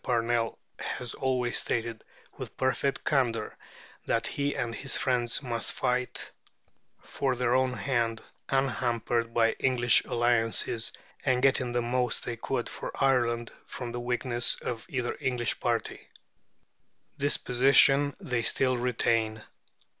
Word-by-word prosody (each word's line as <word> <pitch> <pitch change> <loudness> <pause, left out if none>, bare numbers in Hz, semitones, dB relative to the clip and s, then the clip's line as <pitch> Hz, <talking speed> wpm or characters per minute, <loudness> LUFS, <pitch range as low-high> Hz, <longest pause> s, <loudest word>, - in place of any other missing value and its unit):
Parnell 115 -1 0 0.2
has 125 -2 -4
always 125 -2 0
stated, 115 -1 -2 0.3
with - - -9
perfect 135 +1 0
candour, 120 -6 0 0.5
that 115 0 +1
he 145 0 -2
and 115 -1 -2
his 135 +3 -1
friends 125 0 +1
must 120 -3 0
fight 125 -1 -2 0.7
for 135 -2 -1
their 125 -1 +1
own 130 0 +2
hand 120 -4 -1 0.3
unhampered 120 -3 0
by 115 -1 +3
English 120 -2 +3
alliances, 115 -1 +1 0.3
and 130 -2 +1
getting 130 -2 +3
the 120 0 0
most 125 -1 0
they 120 - -3
could 120 +1 -3
for - - -6
Ireland 120 -4 +1 0.2
from 120 -2 -6
the 120 - -4
weakness 120 0 +2
of 115 -2 -6
either 125 -3 -2
English 125 -3 -1
party. - - -2 1.1
This 145 +1 +3
position 135 +3 +4
they 125 -2 -2
still 130 +2 +1
retain. 115 -3 0
120 Hz, 125 wpm, -28 LUFS, 115-130 Hz, 1.1 s, position